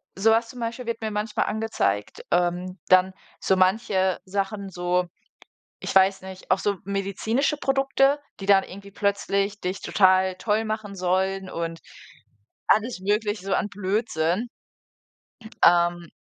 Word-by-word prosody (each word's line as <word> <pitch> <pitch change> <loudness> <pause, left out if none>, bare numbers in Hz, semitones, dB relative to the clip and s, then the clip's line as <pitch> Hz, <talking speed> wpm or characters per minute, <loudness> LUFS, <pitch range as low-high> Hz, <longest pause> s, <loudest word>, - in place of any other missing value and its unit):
so 205 +4 +3
was 230 +1 +2
zum 250 - -10
Beispiel 235 +1 -4
wird 230 -1 -4
mir 220 - -3
manchmal 210 +1 -1
angezeigt. 210 - -2
Ähm, 180 +1 0
dann 185 0 +5 0.3
so 190 - +2
manche 190 0 +2
Sachen 195 +1 -3
so- 180 0 -1 0.7
ich - - -4
weiß 190 0 +4
nicht- 190 0 -10
auch 185 - +5
so 200 -2 -1
medizinische 200 +8 -1
Produkte, 270 +1 +2 0.2
die 195 - -7
dann 195 -1 +6
irgendwie 200 +1 -11
plötzlich 200 0 -1
dich 185 +2 -3
total 185 -1 +3
toll 215 +3 0
machen 215 -2 -4
sollen 190 +1 -1
und 165 0 -4 0.9
alles 220 -2 +2
Mögliche 205 0 -1
so 195 - -1
an - - 0
Blödsinn. 195 -1 -1 1.2
Ähm 175 -1 +3
195 Hz, 135 wpm, -24 LUFS, 185-215 Hz, 1.2 s, dann